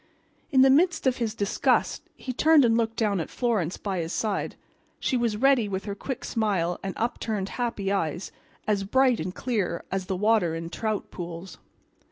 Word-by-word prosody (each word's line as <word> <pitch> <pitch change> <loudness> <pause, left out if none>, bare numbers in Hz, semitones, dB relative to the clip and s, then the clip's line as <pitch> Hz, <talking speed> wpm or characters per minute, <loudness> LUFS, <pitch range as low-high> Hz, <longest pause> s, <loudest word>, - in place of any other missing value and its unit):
In 265 -4 +5
the 265 - +6
midst 340 +5 +3
of 260 -1 +2
his 230 -3 -2
disgust 205 -2 +1
he 255 - -5
turned 305 +1 +5
and 225 -1 +3
looked 225 -1 0
down 210 -5 +1
at 160 - -3
Florence 215 -9 -1
by 195 -3 -3
his 165 0 -3
side. 210 0 -2 0.4
She 260 - 0
was 235 -3 +1
ready 255 -3 +3
with 190 0 -3
her 200 - -3
quick 255 +5 -5
smile 190 -6 0
and 195 -1 -4
upturned, 220 -4 -2
happy 230 -5 -2
eyes, 175 -2 -1 0.4
as 205 -2 +1
bright 255 +3 +3
and 180 +3 -4
clear 210 -9 -1
as 190 -1 -2
the 190 - -1
water 210 -5 +2
in 165 +1 -5
trout 215 +2 -3
pools. 175 0 -7
210 Hz, 185 wpm, -26 LUFS, 190-240 Hz, 0.4 s, the